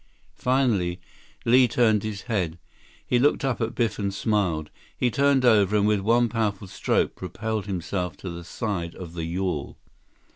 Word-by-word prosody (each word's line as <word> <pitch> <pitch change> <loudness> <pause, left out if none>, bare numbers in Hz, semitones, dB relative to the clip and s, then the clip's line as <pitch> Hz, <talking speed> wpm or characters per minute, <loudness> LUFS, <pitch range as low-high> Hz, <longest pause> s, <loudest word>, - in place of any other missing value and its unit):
Finally, 115 -9 +1 0.5
Li 125 +2 +6
turned 110 -3 +3
his 105 -2 -5
head. 90 -9 -1 0.5
He 125 - +2
looked 140 +1 +2
up 130 -3 -1
at 115 0 -2
Biff 115 -3 0
and 100 -1 -1
smiled. 95 -7 0 0.3
He 125 - +1
turned 140 0 +3
over, 105 -4 +4
and 100 - +3
with 105 -1 +3
one 115 +4 +3
powerful 105 -3 -1
stroke, 95 - 0
propelled 110 -2 -4
himself 90 -1 -3
to 95 - -6
the 85 0 -7
side 90 -3 -4
of 85 -3 -9
the 85 -2 -4
yawl. 85 -3 -3
105 Hz, 160 wpm, -25 LUFS, 90-120 Hz, 0.5 s, Li